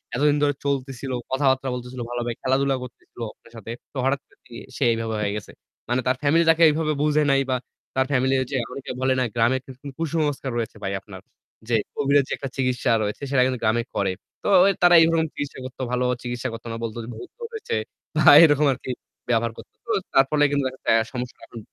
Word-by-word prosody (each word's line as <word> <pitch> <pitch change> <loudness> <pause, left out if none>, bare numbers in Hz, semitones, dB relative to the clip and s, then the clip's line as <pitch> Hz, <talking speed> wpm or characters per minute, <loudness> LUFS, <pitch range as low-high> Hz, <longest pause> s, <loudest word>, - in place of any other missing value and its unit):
এতদিন 145 +3 +3
ধরে 145 0 +3
চলতেছিল, 135 -1 -2 0.2
কথাবার্তা 130 0 +2
বলতেছিল 125 0 -6
ভালো 120 0 -3
ভাবে 120 0 -2
খেলাধুলা 135 +1 +2
করতেছিল 125 - -13
আপনার 115 - -22
সাথে। 115 0 -8 0.2
তো - - -7
হঠাৎ 135 +1 +1
করে - - -27
দেখি 115 - -14 0.2
সে - - 0
এভাবে 115 -1 -3
হয়ে 100 - 0
গেছে। 105 - -8 0.4
মানে 125 +1 +1
তার 130 - +3
ফ্যামিলি 155 +4 +4
তাকে 165 +1 +5
এভাবে 155 0 0
বুঝে 150 0 +3
নাই 135 0 +4
বা 130 - +2 0.4
তার 130 - +2
ফ্যামিলি 130 0 +2 0.2
যে 135 - 0
অনেকে 140 - -6
বলে 130 0 +3
না - - +2
গ্রামের 120 +3 +2
কু - - -19 0.3
কুসংস্কার 150 -4 -1
রয়েছে 115 -2 -3
ভাই 95 - -2
আপনার। 95 -2 -11 0.5
যে 120 - +3 0.2
কোভিডের 140 0 +3
যে - - -11
একটা 135 - -5
চিকিৎসা 130 -2 +1
রয়েছে 105 +5 -4
সেটা 135 -2 +3
কিন্তু 130 -2 -1
গ্রামে 110 +2 +2
করে। 100 -1 +1 0.3
তো - - -2
ও - - +7 0.2
তারা 175 0 +7
এই - - +7
রকম 165 -1 +2
চিকিৎসা 145 -2 -5
করতো 130 0 -8
ভালোভাবে 125 0 +1
চিকিৎসা 120 0 -3
করত 115 - -8
না। - - -4
বলত 115 -1 -4 0.2
ভুত 110 - -9
ধরেছে 460 0 -4 0.4
বা - - +2 0.2
এরকম 150 -2 +5
আরকি 130 0 -6 0.4
ব্যবহার 115 -1 +2
করতো। - - -13
তো 235 - -3 0.2
তার 135 - +6
ফলে 150 -1 +3
কিন্তু 140 -1 +1
দেখা 130 0 -7
যাচ্ছে - - -1
আ - - 0
সমস্যা 125 0 -5
এখন 115 - -10
130 Hz, 215 wpm, -24 LUFS, 120-145 Hz, 0.5 s, ও